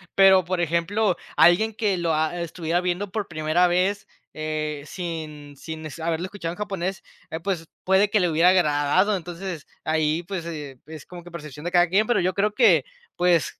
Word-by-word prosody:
Pero, 190 -1 +7
por 180 0 -1
ejemplo, 175 +5 +1 0.2
alguien 215 +6 +5
que 205 -3 0
lo, 170 -2 0
ah, 160 +3 0
estuviera 170 0 -2
viendo 180 +2 -2
por 210 -1 -3
primera 155 +2 +2
vez, 185 +3 0 0.3
eh, 155 -1 -3
sin 155 -5 -6
sin, 160 +2 -7
este, 155 +2 -7
haberlo 165 +1 -1
escuchado 185 -3 -5
en - - -13
japonés, 195 -2 -3 0.3
ah, 160 - -3
pues, 170 -2 -3 0.2
puede 190 +2 +3
que 210 - +3
le 180 -2 +2
hubiera 165 +3 +4
agradado. 180 +3 +3
Entonces, 175 -2 -6 0.2
ahí, 155 +1 +1
pues, 175 -2 -5
eh, 145 -6 -7
es 155 -1 -10
como 175 -1 -11
que 175 - -12
percepción 150 -2 -9
de 175 - -2
cada 175 -1 +5
quien, 200 +5 +3
pero 240 - +2
yo 185 +1 +1
creo 210 +1 +1
que, - - +5 0.3
pues, 175 -2 +1
175 Hz, 190 wpm, -24 LUFS, 160-190 Hz, 0.3 s, Pero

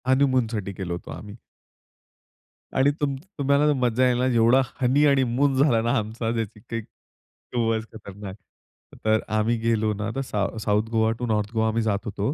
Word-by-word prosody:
हनीमूनसाठी 125 -7 +1
गेलो 90 -2 -3
होतो - - -11
आम्ही. 105 +2 -10 1.4
आणि 135 +2 +4
तुम 140 -2 0 0.2
तुम्हाला 140 +1 +3
ना 150 - +4
मजा 125 0 +2
येईला 125 0 +1
ना 130 - +1
जेवढा 120 +3 +5 0.2
हनी 135 +4 +4
आणि 140 -2 +4
मून 135 +3 +1
झाला 120 -7 +3
ना 115 +1 0
आमचा, 110 +2 -3
त्याची 110 -2 -4
काही 115 +1 -5
खूपच 115 +1 -5
खतरनाक. 100 -2 -9 0.7
तर 110 0 +4 0.2
आम्ही 115 +2 +1
गेलो 110 -1 +1
ना 105 +1 -3
तर 135 - -1
साउ 105 -5 -2
south 105 0 +1
Goa 110 -1 +2
to 125 - -2
north 105 -1 0
Goa 110 -1 +1
आम्ही 110 +1 0
जात 105 -3 0
होतो. 105 +4 -2
115 Hz, 175 wpm, -24 LUFS, 110-130 Hz, 1.4 s, जेवढा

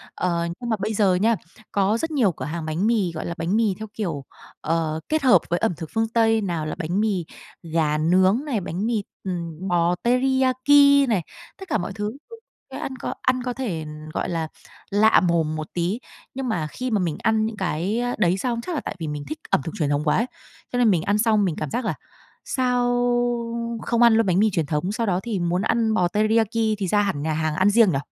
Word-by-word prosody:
Ờ, 170 -2 0
nhưng 240 -1 -5
mà 220 - +2
bây 215 +3 -2
giờ 200 -3 +3
nha, 220 +5 +3 0.4
có 200 +2 +2
rất 325 +6 -3
nhiều 250 -11 +3
cửa - - -7
hàng 165 +1 -4
bánh 160 +6 0
mì, 215 -7 +1
gọi 160 - -5
là, 170 - -3
bánh 165 +5 -1
mì 220 -3 +2
theo 220 - -5
kiểu, 170 -10 -4 0.4
ờ, 160 -1 -1
kết 310 0 +1
hợp 255 - +6
với 175 - +1
ẩm 225 -4 +1
thực 160 -3 -7
phương 225 0 +1
Tây, 225 -1 +3
nào 170 -6 -2
là 155 - -3
bánh 175 +2 -2
mì 200 -6 0 0.4
gà 160 -2 0
nướng 185 - +3
này, 260 -8 -1
bánh 185 +3 -3
mì, 225 -3 0 0.2
ừm, 170 -1 -4
bò 175 -1 +2
teriyaki 265 +3 +4
này, 210 -6 +2 0.4
tất 385 - -10
cả 220 - +2
mọi 195 0 -4
thứ, 210 +4 -4 0.6
ăn 265 - -4
có - - -3
ăn 255 -1 +1
có 250 0 -2
thể, 200 -12 -3 0.3
gọi - - -2
là, 165 -2 -2 0.4
lạ 215 +2 +5
mồm 165 -3 +1
một 155 -1 -4
tí. 180 +6 -1 0.3
Nhưng 265 0 -4
mà 165 -8 -1
khi 250 +11 -5
mà 215 - +2
mình 170 -5 -1
ăn 220 -1 +2
những 220 -1 -4
cái 190 +5 -1 0.2
đấy 175 +1 +2
xong, 235 +3 -2
chắc 345 +8 -4
là 290 - -1
tại - - -5
vì 160 - -4
mình 150 -1 -4
thích 310 - -5
ẩm - - +2
thực 165 - -5
truyền 150 -3 +1
thống 145 +1 0
quá 150 - +2
ấy, 230 - +2 0.5
cho 245 - -1
nên 240 -2 +5
mình 180 -5 +3
ăn 200 +2 +1
xong 215 -2 +3
mình 175 -5 -1
cảm 155 - -4
giác 245 - -2
là - - 0 0.5
sao 250 -2 +1 1.0
không 235 0 +1
ăn 235 -1 +7
luôn 225 0 +3
bánh 185 -1 +2
mì 215 +1 +4
truyền 165 -4 0
thống, 150 +6 -1
sau 230 +2 -1
đó 180 -2 +1
thì 225 -5 -2
muốn 175 +1 0
ăn 220 +1 +1
bò 180 -5 +2
teriyaki 215 +3 +1 0.2
thì 195 -2 -2
ra 205 +3 +3
hẳn 195 -8 -1
nhà 155 +1 -1
hàng 155 0 -1
ăn 190 +5 +4
riêng 215 -2 +5
nhỉ? 135 - 0
200 Hz, 235 wpm, -23 LUFS, 170-230 Hz, 1.0 s, ăn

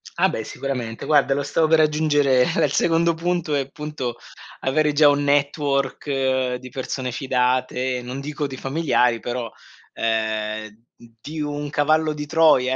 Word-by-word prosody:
Ah - - +3
beh 110 - -3
sicuramente, 120 -3 -5
guarda 145 -2 +3
lo 145 - -1
stavo 155 +2 +1
per 160 0 +4
aggiungere 150 -4 +3
era - - +1
il 140 - -2
secondo 170 +2 +2
punto 170 -1 -2
è 140 - +1
appunto 135 -3 -5 0.5
avere 150 +3 +2
già 150 0 +6
un 145 0 +3
network 140 -2 0
di 130 0 -11
persone 130 0 -4
fidate, 125 0 0
non 125 +2 -6
dico 145 +1 -4
di 135 -1 -8
familiari, 135 -5 +1
però 120 0 -4 0.4
ehm 110 0 -2 0.3
di 155 +6 -6
un 145 0 -3
cavallo 155 +1 +2
di 150 -1 -6
Troia, 145 -5 +4
140 Hz, 150 wpm, -22 LUFS, 125-150 Hz, 0.5 s, già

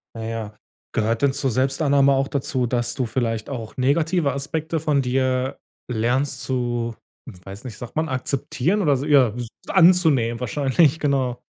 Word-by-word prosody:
Na 115 - -6
ja. 110 -2 -5 0.4
Gehört 110 +2 0
denn 140 -1 +3
zur 140 -2 0
Selbstannahme 140 +2 +3
auch 135 +1 0
dazu, 130 -2 -1
dass 120 0 -1
du 130 - -1
vielleicht 115 -2 -2
auch 115 -5 -6
negative 150 +4 +1
Aspekte 155 +3 -3
von 150 -2 +1
dir 130 0 0 0.3
lernst 130 +4 0
zu, 120 -2 -2 0.5
weiß 100 +6 -10
nicht, 115 -5 -7
sagt 120 +4 -9
man 160 +1 +1
akzeptieren 140 +7 -1
oder 145 -5 +3
so, 135 +2 -3
ja, 135 -7 +4
w 120 - -3 0.2
anzunehmen 160 -11 +4
wahrscheinlich? 145 +4 +2
Genau. 130 -4 0
130 Hz, 155 wpm, -22 LUFS, 120-145 Hz, 0.5 s, ja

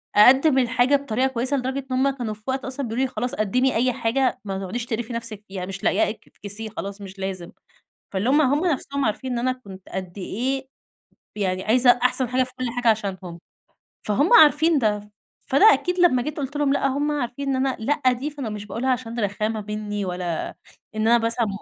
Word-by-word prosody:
أقدّم 265 +6 +6
الحاجة 255 +2 +3
بطريقة 265 -2 0
كويسة، 260 +2 -1
لدرجة 260 +2 -2
إن 255 - +1
هُم 275 +2 +3
كانوا 245 -5 -4
في 210 - -15
وقت 265 0 -2
أصلًا 260 0 -3
بيقولوا 235 +4 0
لي: 260 - -5
"خلاص، 250 -1 -3
قدّمي 250 +6 +1
أي 250 +3 +2
حاجة، 255 +3 0
ما 195 -1 -3
تقعديش 230 +5 -4
تقرفي 235 +1 -4
نفسِك، 230 -3 -5
يعني 185 -2 -5
مش 195 0 -7
لاقياه - - +2
اك 220 - -9
إفكسيه 210 +2 -7
خلاص 200 0 -7
مش 195 0 -10
لازم." 190 -3 -5 0.6
فاللي 195 +5 -1
هُم 295 +3 +5
هُم 290 +6 +2
نفسهم 280 -3 -1
عارفين 235 +4 -2
إن 240 - -1
أنا 255 +2 +1
كُنت 195 -7 -12
قد 185 0 -6
إيه 260 +8 -3 0.7
يعني 190 -2 -1
عايزة 245 +3 +5
أحسن 255 0 +2
حاجة 255 +2 +2
في 255 - -5
كل 255 - -2
حاجة 245 -1 +1
عشانهم، 190 -5 -1 0.7
فهُم 280 - +2
عارفين 315 -5 +6
ده. 210 -2 -1 0.4
فأنا 280 +10 +4
أكيد 360 0 -1
لمّا 340 -8 +4
جيت 300 +4 -5
قُلت 285 0 -4
لهم: 285 -1 +2
"لا." 275 - +1
هُم 285 +3 0
عارفين 280 -1 -3
إن 270 - +1
أنا 265 - -1
لا 265 +2 +2
دي، 265 +5 -4
فأنا 280 -6 -6
مش 210 -1 -6
باقولها 230 +6 -3
عشان 240 -2 -3
رخامة 215 +1 -2
مني 210 -1 -3
ولا 180 -2 -3 0.5
إن 220 0 0
أنا 235 +1 +6
مثلًا 230 0 0
245 Hz, 205 wpm, -23 LUFS, 210-265 Hz, 0.7 s, أقدّم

